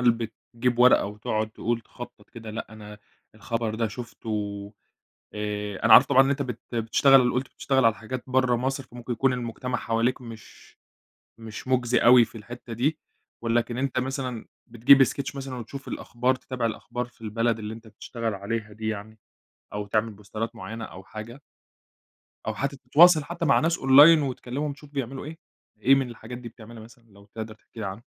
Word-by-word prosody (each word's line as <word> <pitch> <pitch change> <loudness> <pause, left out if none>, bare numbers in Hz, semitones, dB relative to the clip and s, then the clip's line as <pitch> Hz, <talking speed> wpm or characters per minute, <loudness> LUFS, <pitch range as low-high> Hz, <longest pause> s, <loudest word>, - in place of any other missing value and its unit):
هل 125 -1 +5 0.4
بتجيب 120 0 0
ورقة 125 +1 +6
وتقعد 110 +1 -3
تقول 115 +1 -2
تخطط 120 +1 -12
كده؟ 115 -2 -9
لأ، 110 - -5
أنا 105 -1 -11 0.4
الخبر 110 0 -3
ده 115 0 0
شفته، 105 -3 -5 0.6
آآ، 105 -1 -4
أنا 115 - +6
عارف 125 - +10
طبعًا 135 -1 +6
إن 135 - 0
أنتَ 140 0 0
بت 125 -4 -6
بتشتغل 125 +3 +4
قُلت 130 +1 -1
بتشتغل 135 -3 0
على 115 - +5
حاجات 120 +3 -6
برّه 130 -1 +2
مصر، 135 +2 -2
فممكن 120 0 -7
يكون 135 +2 +2
المجتمع 125 +1 -3
حواليك 115 +3 0
مش 115 -2 -13 0.6
مش 115 +2 -9
مُجزي 125 -1 +2
أوي 120 0 +7
في 115 - -12
الحتّة 120 +2 -9
دي. 145 +7 0 0.4
ولكن 120 +1 0
أنتَ 135 -1 -1
مثلًا 130 -2 -4 0.2
بتجيب 125 +4 +6
sketch 140 +3 -3
مثلًا 135 -1 -5
وتشوف 130 +3 -8
الأخبار، 125 +2 -1
تتابع 130 -2 -4
الأخبار 120 +2 -3
في 120 -1 -23
البلد 115 +1 0
اللي 105 +1 -5
أنتَ 115 0 -12
بتشتغل 115 +1 -5
عليها 105 +2 -4
دي 110 0 -5
يعني؟ 110 +1 -5 0.5
أو 105 0 -4
تعمل 110 +2 0
بوسترات 110 +3 -6
معيّنة 115 0 -6
أو 95 +1 -11
حاجة؟ 110 +7 -9 1.1
أو 110 - -1
حتّى 140 +4 -3
تتواصل 155 +5 +6
حتّى 170 +1 -4
مع 140 - +4
ناس 165 +1 +1
أونلاين 145 +4 +8
وتكلمهم، 140 +2 -3
تشوف 145 0 -15
بيعملوا 135 -1 -4
إيه؟ 160 +2 -8 0.4
إيه 135 - +6
من 135 -3 0
الحاجات 120 +1 -9
دي 120 -1 -8
بتعملها 110 0 -12
مثلًا 115 +1 -16
لو 100 0 -18
تقدر 110 -1 -6
تحكي 110 +1 -14
لي 105 - -3
عنها؟ 100 +4 -6
120 Hz, 175 wpm, -26 LUFS, 110-130 Hz, 1.1 s, عارف